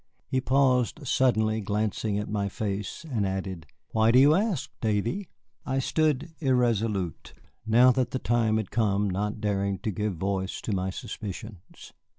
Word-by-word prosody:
He 130 -1 -1
paused 130 +2 +2
suddenly 110 -4 +2
glancing 105 +1 -1
at 105 - -3
my 100 -1 -1
face, 100 - -4
and 120 -8 -1
added, 95 -3 -3 0.2
"Why 110 0 +3
do 120 - +5
you 140 +3 +7
ask, 180 - 0
Davy?" 115 - -1 0.3
I 135 - -2
stood 155 +3 0
irresolute, 115 - 0 0.3
now 120 +3 +6
that 130 0 0
the - - -2
time 115 -3 +1
had 110 -4 -3
come 105 -3 +1
not 105 +3 -2
daring 100 -2 0
to 110 - 0
give 105 0 -2
voice 95 +2 -2
to 110 - -3
my 95 0 -1
suspicions. 100 0 -8
110 Hz, 155 wpm, -27 LUFS, 100-130 Hz, 0.3 s, you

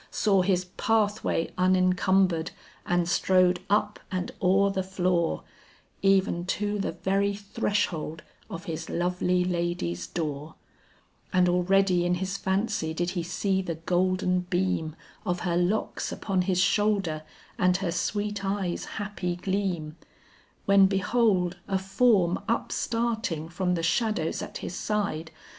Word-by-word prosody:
Saw 195 -3 +2
his 180 -1 +1
pathway 210 -2 0
unencumbered 185 -2 +3 0.4
and 175 -1 +1
strode 180 0 +3
up 210 +1 +1
and 185 -1 -2
o'er 195 +2 +4
the 190 -1 -1
floor, 180 -3 0 0.6
Even 195 -3 +3
to 205 +1 -1
the - - -2
very 200 +1 0
threshold 195 -5 -2 0.3
of 165 - -6
his 165 0 -5
lovely 180 +1 +1
lady's 170 - -2
door, 150 - -4 0.8
And 180 -1 +4
already 180 0 +3
in 175 0 +1
his 190 +2 -3
fancy 190 -4 -1
did 175 +1 -1
he 180 -2 -2
see 190 +3 0
the 170 -3 -4
golden 180 +2 +1
beam 175 -4 0 0.3
Of 180 -3 -2
her 175 -2 0
locks 180 +5 0
upon 195 -3 -1
his 180 0 0
shoulder 195 -4 +2 0.4
and 180 -2 +3
her 185 -2 -2
sweet 205 +3 -2
eyes' 195 -3 -2
happy 205 -4 -3
gleam: 180 -4 -2 0.7
When 200 -1 +6
behold 195 -2 +1
a 195 - +1
form 190 -2 +2
upstarting 230 -8 -1
from 180 +1 0
the 165 - -2
shadows 195 -2 0
at - - -6
his - - -5
side. 195 -6 -2
185 Hz, 130 wpm, -27 LUFS, 175-200 Hz, 0.8 s, When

